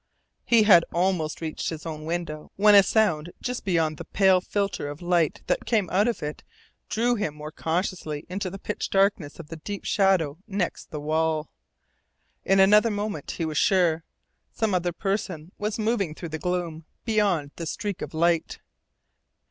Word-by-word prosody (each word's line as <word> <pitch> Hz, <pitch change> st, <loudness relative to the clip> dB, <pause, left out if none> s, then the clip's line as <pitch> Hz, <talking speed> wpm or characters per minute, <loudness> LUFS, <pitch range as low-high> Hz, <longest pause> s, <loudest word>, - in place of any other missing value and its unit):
He 230 Hz, -2 st, +5 dB
had 180 Hz, -5 st, +7 dB
almost 175 Hz, -3 st, 0 dB
reached 160 Hz, -1 st, -3 dB
his 160 Hz, -1 st, -7 dB
own 155 Hz, -1 st, -6 dB
window 165 Hz, -2 st, -4 dB
when 210 Hz, +1 st, +6 dB
a 200 Hz, -, +10 dB
sound 185 Hz, -6 st, +1 dB
just 250 Hz, -1 st, -4 dB
beyond 165 Hz, -5 st, +1 dB
the -, -, -6 dB
pale 190 Hz, -2 st, +3 dB
filter 200 Hz, -5 st, -2 dB
of 145 Hz, +1 st, -7 dB
light 175 Hz, -3 st, +1 dB
that -, -, -1 dB
came 210 Hz, -7 st, +1 dB
out 200 Hz, +5 st, +3 dB
of 235 Hz, -9 st, -2 dB
it 150 Hz, 0 st, -5 dB, 0.5 s
drew 240 Hz, +2 st, +1 dB
him 200 Hz, -10 st, -2 dB
more 150 Hz, 0 st, -8 dB
cautiously 165 Hz, -2 st, -3 dB
into 185 Hz, +1 st, -3 dB
the 195 Hz, -, -7 dB
pitch -, -, -4 dB
darkness 195 Hz, -6 st, +1 dB
of 160 Hz, -2 st, -9 dB
the 165 Hz, -, -7 dB
deep 200 Hz, +5 st, -6 dB
shadow 185 Hz, -7 st, +2 dB
next 195 Hz, -4 st, -3 dB
the 150 Hz, -, -5 dB
wall. 155 Hz, +1 st, 0 dB, 0.9 s
In 195 Hz, 0 st, +3 dB
another 210 Hz, +4 st, +6 dB
moment 205 Hz, -7 st, -3 dB
he 165 Hz, -, -1 dB
was 155 Hz, -2 st, -1 dB
sure. 175 Hz, -5 st, +3 dB, 0.5 s
Some 220 Hz, -3 st, -1 dB
other 175 Hz, -1 st, +1 dB
person 180 Hz, -3 st, -3 dB
was 210 Hz, +1 st, -2 dB
moving 215 Hz, -7 st, 0 dB
through 170 Hz, -, -7 dB
the 160 Hz, 0 st, -5 dB
gloom 170 Hz, -2 st, -3 dB, 0.2 s
beyond 200 Hz, -10 st, +1 dB
the 165 Hz, -, -4 dB
streak 205 Hz, +3 st, -4 dB
of -, -, -6 dB
light. 170 Hz, 0 st, +1 dB
175 Hz, 170 wpm, -25 LUFS, 160-200 Hz, 0.9 s, a